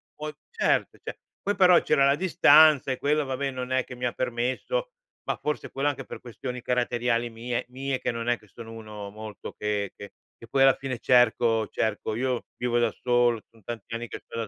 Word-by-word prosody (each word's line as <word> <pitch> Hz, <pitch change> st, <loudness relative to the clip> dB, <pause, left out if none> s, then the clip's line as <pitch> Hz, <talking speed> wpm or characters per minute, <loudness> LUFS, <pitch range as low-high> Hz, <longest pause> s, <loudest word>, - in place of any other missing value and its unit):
poi 150 Hz, 0 st, -6 dB, 0.2 s
cert 465 Hz, -, 0 dB
ce -, -, -7 dB, 0.2 s
poi 205 Hz, +1 st, 0 dB
però 180 Hz, -2 st, +6 dB
c'era 140 Hz, -, +3 dB
la 140 Hz, +1 st, +4 dB
distanza 155 Hz, -5 st, +6 dB
e 130 Hz, -, -2 dB
quella, 150 Hz, +1 st, +1 dB
vabbè, 135 Hz, +1 st, -2 dB
non 130 Hz, 0 st, -5 dB
è 130 Hz, 0 st, +2 dB
che 125 Hz, -, -9 dB
mi 125 Hz, 0 st, -4 dB
ha 120 Hz, -, +1 dB
permesso 130 Hz, -, -2 dB, 0.4 s
ma -, -, -1 dB
forse 150 Hz, 0 st, -3 dB
quello, 140 Hz, +2 st, -1 dB
anche 145 Hz, -, -5 dB
per -, -, -8 dB
questioni 125 Hz, +1 st, -6 dB
caratteriali 120 Hz, -1 st, 0 dB
mie 120 Hz, +2 st, -3 dB
mie, 135 Hz, +1 st, -3 dB
che -, -, -1 dB
non 115 Hz, 0 st, -5 dB
è 120 Hz, -, +2 dB
che 105 Hz, -, -22 dB
sono 115 Hz, +3 st, -11 dB
uno 105 Hz, -2 st, -8 dB
molto 110 Hz, 0 st, -8 dB
che 105 Hz, -2 st, -2 dB
che 100 Hz, -, -10 dB, 0.2 s
che 115 Hz, -, -13 dB
poi 135 Hz, +3 st, +1 dB
alla 135 Hz, -1 st, +6 dB
fine 130 Hz, -3 st, -5 dB
cerco 115 Hz, -3 st, +3 dB
cerco. 110 Hz, 0 st, -2 dB
Io 125 Hz, 0 st, -1 dB
vivo 120 Hz, -1 st, 0 dB
da 115 Hz, -2 st, +2 dB
solo, 120 Hz, -2 st, +2 dB
son 115 Hz, -3 st, -22 dB
tanti 115 Hz, 0 st, -7 dB
anni 120 Hz, 0 st, -5 dB
che -, -, -7 dB
sto -, -, -9 dB
da 115 Hz, -2 st, -2 dB
125 Hz, 210 wpm, -26 LUFS, 115-135 Hz, 0.4 s, però